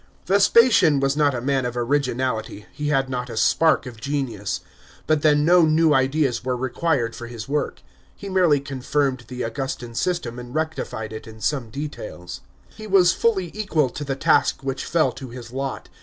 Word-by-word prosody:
Vespasian 200 Hz, -, +5 dB
was 135 Hz, 0 st, +1 dB
not 145 Hz, -3 st, +2 dB
a 120 Hz, -, -3 dB
man 135 Hz, +1 st, 0 dB
of 125 Hz, 0 st, -3 dB
originality, 125 Hz, -4 st, -1 dB
he 150 Hz, 0 st, -4 dB
had 135 Hz, -2 st, +1 dB
not 125 Hz, -1 st, -4 dB
a 115 Hz, -, -6 dB
spark 160 Hz, +5 st, +3 dB
of 115 Hz, -4 st, -10 dB
genius. 120 Hz, -8 st, -3 dB, 0.4 s
But 155 Hz, -1 st, +2 dB
then 150 Hz, -1 st, +4 dB
no 175 Hz, +2 st, +6 dB
new 160 Hz, 0 st, +4 dB
ideas 135 Hz, -2 st, +1 dB
were 125 Hz, 0 st, -1 dB
required 130 Hz, -1 st, -1 dB
for 120 Hz, -, -7 dB
his 115 Hz, -2 st, -8 dB
work. 145 Hz, +2 st, -2 dB, 0.3 s
He 200 Hz, -, -9 dB
merely 180 Hz, -6 st, +3 dB
confirmed 135 Hz, -2 st, -2 dB
the 125 Hz, 0 st, -5 dB
Augustan 120 Hz, 0 st, -4 dB
system 125 Hz, -4 st, -2 dB
and 125 Hz, +2 st, -9 dB
rectified 155 Hz, -8 st, -3 dB
it 110 Hz, -, -8 dB
in 110 Hz, 0 st, -12 dB
some 120 Hz, +1 st, -1 dB
details. 110 Hz, -9 st, -7 dB, 0.3 s
He 215 Hz, -1 st, -10 dB
was 185 Hz, -3 st, +5 dB
fully 190 Hz, -7 st, 0 dB
equal 170 Hz, -10 st, 0 dB
to 150 Hz, -, -6 dB
the 135 Hz, -1 st, -2 dB
task 135 Hz, -, +2 dB
which 135 Hz, 0 st, -3 dB
fell 160 Hz, -1 st, +2 dB
to 135 Hz, -2 st, -9 dB
his 120 Hz, -1 st, -10 dB
lot. 135 Hz, +1 st, -4 dB
135 Hz, 180 wpm, -23 LUFS, 120-155 Hz, 0.4 s, no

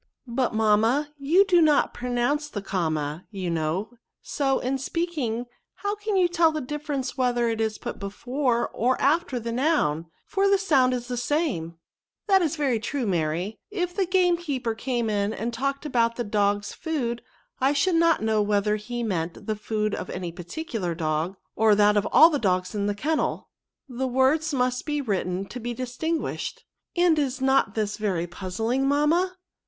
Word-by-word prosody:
" -, -, -44 dB
But, 240 Hz, -1 st, -1 dB
mamma, 225 Hz, +7 st, +2 dB
you 335 Hz, +8 st, +4 dB
do 355 Hz, -3 st, +4 dB
not 300 Hz, -2 st, +3 dB
pronounce 250 Hz, +5 st, -1 dB
the 205 Hz, -7 st, -5 dB
comma, 155 Hz, -4 st, -2 dB
you 190 Hz, -4 st, -4 dB
know; 165 Hz, +7 st, -1 dB, 0.3 s
so, 270 Hz, -2 st, 0 dB
in 265 Hz, +2 st, -1 dB
speaking, 270 Hz, -6 st, -2 dB, 0.3 s
how 405 Hz, 0 st, -2 dB
can 420 Hz, 0 st, -3 dB
you 365 Hz, -2 st, +4 dB
tell 340 Hz, -2 st, +3 dB
the 310 Hz, -, -2 dB
difference 285 Hz, -1 st, -4 dB
whether 240 Hz, -2 st, +2 dB
it 225 Hz, -1 st, -1 dB
is 220 Hz, -1 st, -1 dB
put -, -, -6 dB
before 240 Hz, +5 st, -1 dB
or 250 Hz, +3 st, 0 dB
after 280 Hz, -3 st, +1 dB
the 230 Hz, 0 st, -4 dB
noun, 230 Hz, -, +1 dB, 0.2 s
for 395 Hz, 0 st, +1 dB
the 395 Hz, -, +5 dB
sound 270 Hz, -10 st, +3 dB
is 245 Hz, -1 st, -5 dB
the 250 Hz, -1 st, -3 dB
same? 240 Hz, -, -1 dB, 0.2 s
" -, -, -68 dB
" -, -, -60 dB
That 385 Hz, -2 st, +5 dB
is 330 Hz, -2 st, 0 dB
very 270 Hz, -7 st, +1 dB
true, 260 Hz, +3 st, -2 dB
Mary; 175 Hz, +2 st, -1 dB
if 360 Hz, -4 st, -3 dB
the 390 Hz, -3 st, +1 dB
game 360 Hz, -1 st, +3 dB
keeper 270 Hz, -9 st, -2 dB
came 235 Hz, 0 st, -2 dB
in 205 Hz, 0 st, 0 dB
and 235 Hz, +2 st, -3 dB
talked 275 Hz, +4 st, -2 dB
about 235 Hz, -5 st, +1 dB
the 240 Hz, -, -2 dB
dogs 205 Hz, -1 st, 0 dB
food, 250 Hz, -8 st, -3 dB, 0.4 s
I 265 Hz, +2 st, +3 dB
should 295 Hz, +6 st, +2 dB
not 330 Hz, -6 st, +3 dB
know 220 Hz, -1 st, +2 dB
whether 210 Hz, 0 st, +1 dB
he 240 Hz, +3 st, -5 dB
meant 175 Hz, -6 st, -3 dB
the 215 Hz, -, -1 dB
food 215 Hz, 0 st, -2 dB
of -, -, -4 dB
any 180 Hz, -2 st, -4 dB
particular 180 Hz, -, -4 dB
dog, 160 Hz, +3 st, -1 dB, 0.2 s
or 220 Hz, -1 st, +4 dB
that 210 Hz, 0 st, +4 dB
of 205 Hz, -1 st, +2 dB
all 325 Hz, +2 st, +8 dB
the 290 Hz, -, 0 dB
dogs 185 Hz, -4 st, 0 dB
in 205 Hz, -1 st, -1 dB
the 205 Hz, -, -1 dB
kennel; 305 Hz, +9 st, -1 dB, 0.4 s
the 260 Hz, 0 st, -3 dB
words 265 Hz, +5 st, +2 dB
must 255 Hz, -1 st, 0 dB
be 295 Hz, -1 st, 0 dB
written 195 Hz, -6 st, -1 dB
to 250 Hz, -, -6 dB
be 240 Hz, 0 st, -4 dB
distinguished." 255 Hz, +7 st, -3 dB, 0.2 s
" -, -, -59 dB
And 345 Hz, -3 st, +4 dB
is 275 Hz, -2 st, -1 dB
not 265 Hz, -5 st, +2 dB
this 210 Hz, -2 st, -1 dB
very 190 Hz, -6 st, -1 dB
puzzling, 220 Hz, +9 st, -2 dB
mamma 325 Hz, +6 st, +2 dB
245 Hz, 185 wpm, -25 LUFS, 210-295 Hz, 0.4 s, all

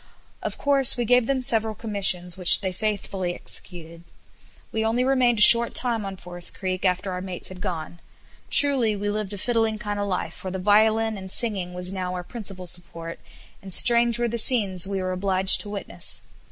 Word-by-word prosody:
Of -, -, -6 dB
course 275 Hz, -2 st, +3 dB
we 240 Hz, -, -2 dB
gave 245 Hz, 0 st, +2 dB
them 270 Hz, -2 st, -2 dB
several 220 Hz, -2 st, +1 dB
commissions, 190 Hz, -5 st, +1 dB
which 180 Hz, -2 st, +6 dB
they 190 Hz, -2 st, -3 dB
faithfully 190 Hz, -2 st, -4 dB
executed. 170 Hz, -2 st, -5 dB, 0.7 s
We 220 Hz, -, -3 dB
only 230 Hz, +3 st, -1 dB
remained 255 Hz, -3 st, +1 dB
a 210 Hz, -, +7 dB
short 235 Hz, 0 st, +8 dB
time 235 Hz, -4 st, 0 dB
on 195 Hz, -1 st, -8 dB
Forest 175 Hz, -1 st, -2 dB
Creek 185 Hz, -1 st, -5 dB
after 185 Hz, +1 st, -1 dB
our 180 Hz, 0 st, -6 dB
mates 185 Hz, -2 st, -4 dB
had 185 Hz, -1 st, -12 dB
gone. 175 Hz, -3 st, -7 dB, 0.5 s
Truly 260 Hz, -7 st, +5 dB
we 205 Hz, +1 st, -4 dB
lived 210 Hz, -1 st, -5 dB
a -, -, -7 dB
fiddling 225 Hz, 0 st, -2 dB
kind 205 Hz, -1 st, -6 dB
of 205 Hz, -, -3 dB
life 185 Hz, -2 st, -4 dB
for 190 Hz, -, -9 dB
the 190 Hz, -, -6 dB
violin 220 Hz, +2 st, +1 dB
and 190 Hz, -1 st, -10 dB
singing 190 Hz, -7 st, 0 dB
was 180 Hz, +1 st, -1 dB
now 185 Hz, -1 st, -5 dB
our 180 Hz, -, -6 dB
principal 195 Hz, -3 st, -7 dB
support, 170 Hz, -1 st, -6 dB, 0.4 s
and 195 Hz, -, -12 dB
strange 235 Hz, +4 st, +3 dB
were 240 Hz, 0 st, -2 dB
the 235 Hz, 0 st, -3 dB
scenes 200 Hz, -7 st, +1 dB
we 195 Hz, -1 st, -4 dB
were 185 Hz, -, -4 dB
obliged 190 Hz, 0 st, +3 dB
to 205 Hz, -, -10 dB
witness. 200 Hz, -1 st, -3 dB
200 Hz, 195 wpm, -22 LUFS, 185-225 Hz, 0.7 s, short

